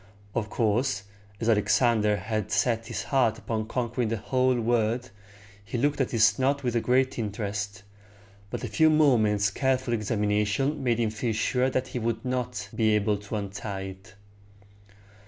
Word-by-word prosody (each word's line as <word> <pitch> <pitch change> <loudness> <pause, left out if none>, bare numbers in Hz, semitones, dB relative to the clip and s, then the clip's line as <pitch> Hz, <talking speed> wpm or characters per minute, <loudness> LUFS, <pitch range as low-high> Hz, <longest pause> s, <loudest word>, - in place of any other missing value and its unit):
Of 110 -3 -2
course, 115 +1 0 0.4
as 115 - -2
Alexander 110 -1 +3
had 105 +1 -3
set 115 +2 +1
his 115 - -4
heart 120 -5 +2
upon 110 -1 -3
conquering 120 -1 -1
the 115 +1 -1
whole 130 +3 +1
world, 120 +1 0 0.5
he 110 +4 -4
looked 145 +3 +1
at 130 - 0
this 110 -1 +3
knot 140 +2 +1
with 120 -2 0
great 130 +1 +1
interest; 105 -2 -4 0.7
but - - -5
a - - -2
few 160 -1 +4
moments' 110 -10 +3
careful 130 +1 0
examination 105 +5 0
made 120 -3 +2
him 115 -2 +1
feel 110 +1 -2
sure 125 +4 +1
that 130 0 -2
he 125 - -3
would 115 0 -2
not 125 -5 -2
be 110 -1 +2
able 105 0 +1
to 105 +2 -7
untie 100 -1 -4
it. 95 +1 -14
115 Hz, 155 wpm, -27 LUFS, 105-125 Hz, 0.7 s, few